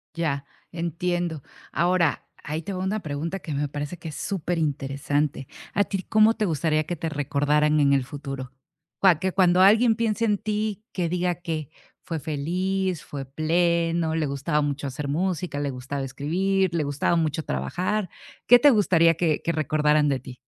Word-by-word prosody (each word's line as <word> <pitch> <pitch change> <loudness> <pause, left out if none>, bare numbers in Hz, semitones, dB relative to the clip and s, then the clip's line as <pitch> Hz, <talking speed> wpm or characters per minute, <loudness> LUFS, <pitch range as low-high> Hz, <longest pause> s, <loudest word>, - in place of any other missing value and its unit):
Ya. 145 -5 -1 0.3
Entiendo. 170 -1 -2 0.3
Ahora, 170 0 +1 0.2
ahí 155 +3 -3
te 195 +5 -5
va 185 0 -3
una 205 +3 -1
pregunta 160 +3 -4
que 160 - -6
me 145 +1 -1
parece 145 +4 -5
que 165 -1 -7
es 150 - -8
súper 180 -3 -2
interesante, 145 -1 -1 0.3
¿a 205 - +3
ti 195 -2 -4
cómo 220 +2 +4
te 215 - 0
gustaría 155 -2 +1
que 175 - -3
te 165 0 -3
recordaran 150 +1 +1
en 140 -1 +4
el 135 -2 +2
futuro?, 135 -1 -7 0.5
cua 185 -5 +5
que 190 +1 0
cuando 180 -1 +4
alguien 220 +4 +6
piense 230 0 0
en 210 -2 +2
ti 210 0 -2
que 180 -3 -1
diga, 180 0 0
¿qué? 160 -3 -4 0.3
Fue 165 -2 -4
feliz, 175 +4 -2
fue 145 -2 -6
pleno, 165 +3 +1
le 160 -1 0
gustaba 140 +2 -1
mucho 145 0 -2
hacer 140 +2 -5
música, 170 0 -1
le 145 -1 -1
gustaba 130 +2 -5
escribir, 180 +8 0
le 165 -2 +1
gustaba 145 +4 0
mucho 160 -1 0
trabajar, 180 - -2 0.4
¿qué 245 +1 +8
te 290 - +7
gustaría 170 -7 +4
que 160 -2 +1
que 170 - +1
recordaran 150 -1 +2
de 135 -2 0
ti? 125 -1 -11
160 Hz, 175 wpm, -25 LUFS, 145-185 Hz, 0.5 s, qué